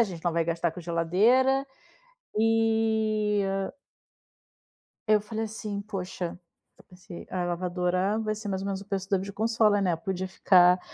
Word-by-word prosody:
a - - +8
gente 180 -5 -8
não 175 - +1
vai 165 0 +1
gastar 170 +1 0
com 180 - -8
geladeira 215 +12 +2 0.7
e 220 -1 +2 1.7
eu 215 0 +5
falei 220 +1 -4
assim: 210 -2 -5
"Poxa, 185 -4 -5 0.4
eu - - -19
pensei 180 -1 -11
a 180 -1 -2
lavadora 180 +3 0
vai 215 -1 -2
ser 215 0 -7
mais 190 -1 -2
ou - - -5
menos 195 -1 -3
o - - -11
preço 195 -1 -4
da 195 - +3
video 195 +2 -6
consola, 220 -1 +2
né. 180 -3 +2
Eu - - -2
podia 190 -1 -3
ficar, 180 -1 +5
195 Hz, 165 wpm, -27 LUFS, 180-215 Hz, 1.7 s, a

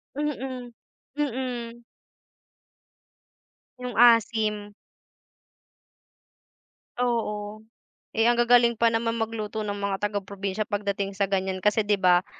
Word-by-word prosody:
Mm, 265 -4 -4 0.5
mm. 245 -4 -3 2.0
Yung 250 -1 -5
asim. 215 -3 +3 2.3
Oo, 215 -3 -1 0.6
eh 225 - +4
ang 240 - +5
gagaling 240 0 +4
pa 230 +1 +3
naman 230 0 0
magluto 220 -1 -3
ng 205 -1 -4
mga 200 -1 -1
taga-probinsya 200 0 -3
pagdating 200 -1 -2
sa 195 0 -1
ganiyan 190 -1 -1
kasi 210 0 +2
'di 205 - +3
ba, 180 0 +4
220 Hz, 95 wpm, -26 LUFS, 205-235 Hz, 2.3 s, ang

